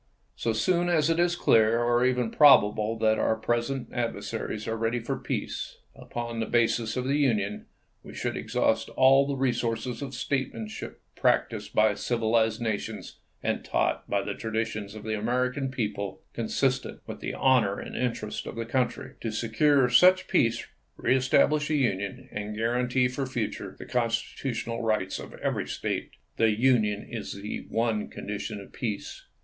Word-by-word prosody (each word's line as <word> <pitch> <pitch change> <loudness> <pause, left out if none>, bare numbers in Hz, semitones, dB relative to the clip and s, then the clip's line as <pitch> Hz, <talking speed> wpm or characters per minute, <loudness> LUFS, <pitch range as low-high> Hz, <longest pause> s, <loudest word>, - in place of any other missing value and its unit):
So 115 - -1
soon 175 +11 +1
as 165 -2 +3
it 165 - +1
is 175 0 +3
clear, 115 -7 +4
or 120 0 +3
even 125 -2 +1
probable, 110 -6 +5
that 110 -1 +2
our 110 - +2
present 120 +4 -1
adversaries 110 -2 -3
are 115 - -1
ready 115 +2 0
for 115 - -3
peace, - - -4 0.2
upon 120 -1 -5
the 110 - -1
basis 115 0 +1
of 125 - 0
the 140 +2 +1
Union, 105 -7 0 0.3
we - - -12
should - - -2
exhaust - - 0
all 135 +1 +6
the 140 - -1
re 130 -2 +1
sources 120 +2 -2
of 135 -2 -5
statesmanship 120 -5 -4
practiced - - 0
by 110 0 +5
civilized 110 0 +1
nations 110 -3 -4 0.2
and - - -1
taught - - -1
by - - +1
the - - -3
traditions 110 -2 -3
of 110 - -8
the 110 0 -2
American 125 +5 0
people, 105 -6 -3
con 115 - -3
sistent 130 +3 -1
with - - -7
the - - -4
honor 125 -7 +3
and - - -7
interests 115 -4 -3
of - - -6
the 115 0 -3
country, 125 +2 -1
to 115 - -2
secure 125 +5 +3
such 185 +9 +5
peace, 115 -1 +2 0.3
reestablish 130 +4 +3
the 155 - +1
Union, 120 +1 -1
and 105 +1 -5
guarantee 125 +3 +1
for 130 +2 -3
the - - -8
future 120 -5 -4
the - - -9
constitutional 115 0 -2
rights 110 -4 0
of - - -9
every - - -1
State. - - -3 0.2
The 115 - +4
Union 110 -5 +2
is 115 -3 -5
the 100 +2 -6
one 115 -2 0
condition 105 +1 -5
of 100 - -12
peace. 110 -5 -5
115 Hz, 165 wpm, -27 LUFS, 110-130 Hz, 0.3 s, all